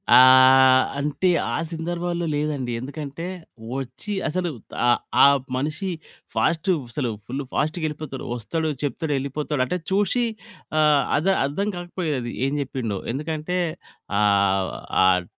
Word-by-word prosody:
ఆహ్, 130 0 +8 0.2
అంటే 150 +6 0 0.2
ఆ - - 0
సందర్భాల్లో 170 +1 -2
లేదండి. 145 -5 -2
ఎందుకంటే, 145 +4 -6 0.5
వచ్చి 135 - -5 0.2
అసలు 180 +1 -1 0.4
ఆ - - +4 0.3
ఆ - - +10 0.3
మనిషి 155 +8 -2 0.5
ఫాస్ట్ 165 +2 +1 0.2
అసలు 125 -4 -2 0.2
ఫుల్ 135 +4 -4
ఫాస్ట్‌గ 155 +2 -1
ఎళ్ళిపోతాడు. 150 -3 -6
వస్తడు, 160 +7 -2
చెప్తడు, 150 +1 -2
ఎళ్ళిపోతాడు. 140 0 -2
అంటే 180 - -2
చూషి 205 +5 +2 0.5
ఆ! - - +5 0.4
అర్ద 160 +6 -1 0.2
అర్థం 195 +9 -2
కాకపోయేది 160 -9 -3
ఏం 140 - -2
చెప్పిండో. 125 -7 -3 0.2
ఎందుకంటే 155 +4 -3 0.6
ఆహ్, 100 -2 +3 0.3
ఆహ్, 90 -1 +4
145 Hz, 115 wpm, -23 LUFS, 130-165 Hz, 0.6 s, ఆ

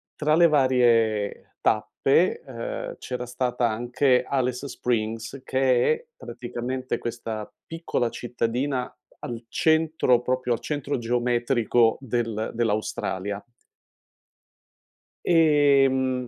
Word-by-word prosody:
tra 150 0 +2
le 170 +1 +6
varie 120 -7 +2
tappe, 135 +10 +2
ehm, 115 -3 -6
c'era 125 -1 -5
stata 125 -1 -1
anche 120 +4 +1
Alice 130 0 -1
Springs, 115 +1 -3
che 130 - +2
è 465 +1 -7
praticamente 125 +2 -4
questa 115 -2 -5 0.2
piccola 165 -7 -2
cittadina 125 +3 -2 0.3
al 120 -1 -7
centro 160 -2 +2
proprio 125 0 -1
al - - -2
centro 145 -2 -3
geometrico 120 -1 +1
del 115 -3 -2
dell'Australia. 105 -3 -2 1.8
Ehm, 140 -6 +3
125 Hz, 90 wpm, -25 LUFS, 115-135 Hz, 1.8 s, le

